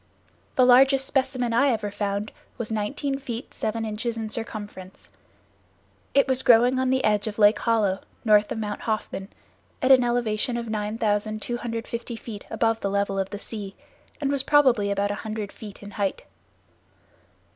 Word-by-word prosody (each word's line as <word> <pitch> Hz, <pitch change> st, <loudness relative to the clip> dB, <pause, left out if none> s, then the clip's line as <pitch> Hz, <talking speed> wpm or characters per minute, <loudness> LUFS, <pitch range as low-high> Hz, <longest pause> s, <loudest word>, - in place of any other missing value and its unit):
The 255 Hz, -, +5 dB
largest 270 Hz, +2 st, +6 dB
specimen 255 Hz, -3 st, 0 dB
I 275 Hz, +5 st, +4 dB
ever 215 Hz, -4 st, -1 dB
found 205 Hz, +1 st, -2 dB, 0.3 s
was 230 Hz, -2 st, -4 dB
nineteen 270 Hz, +6 st, -2 dB
feet 245 Hz, -2 st, -6 dB
seven 225 Hz, +1 st, -2 dB
inches 225 Hz, +2 st, -3 dB
in 220 Hz, -1 st, -4 dB
circumference. 205 Hz, -4 st, -6 dB, 1.0 s
It 275 Hz, -, +5 dB
was 260 Hz, -1 st, +2 dB
growing 245 Hz, +1 st, +5 dB
on 260 Hz, 0 st, +1 dB
the 260 Hz, 0 st, +1 dB
edge 210 Hz, 0 st, +2 dB
of 210 Hz, -, -5 dB
Lake 210 Hz, 0 st, +5 dB
Hollow, 210 Hz, -5 st, +1 dB, 0.3 s
north 210 Hz, -1 st, +4 dB
of -, -, -2 dB
Mount 210 Hz, -1 st, -4 dB
Hoffman, 215 Hz, -3 st, -3 dB, 0.5 s
at 255 Hz, -, +3 dB
an 255 Hz, -2 st, +7 dB
elevation 240 Hz, -1 st, 0 dB
of 235 Hz, -1 st, -4 dB
9250 220 Hz, +2 st, -2 dB
feet 220 Hz, -2 st, -8 dB
above 225 Hz, -1 st, +1 dB
the 200 Hz, -, -2 dB
level 200 Hz, 0 st, 0 dB
of 195 Hz, 0 st, -1 dB
the 205 Hz, -, -5 dB
sea, 205 Hz, -2 st, -7 dB, 0.4 s
and 280 Hz, -2 st, 0 dB
was 280 Hz, -2 st, +1 dB
probably 260 Hz, -8 st, +4 dB
about 200 Hz, 0 st, 0 dB
a 205 Hz, -, -4 dB
hundred 215 Hz, -2 st, -5 dB
feet 210 Hz, -2 st, -11 dB
in 205 Hz, -, -9 dB
height. 200 Hz, -2 st, -2 dB
220 Hz, 160 wpm, -25 LUFS, 205-245 Hz, 1.0 s, an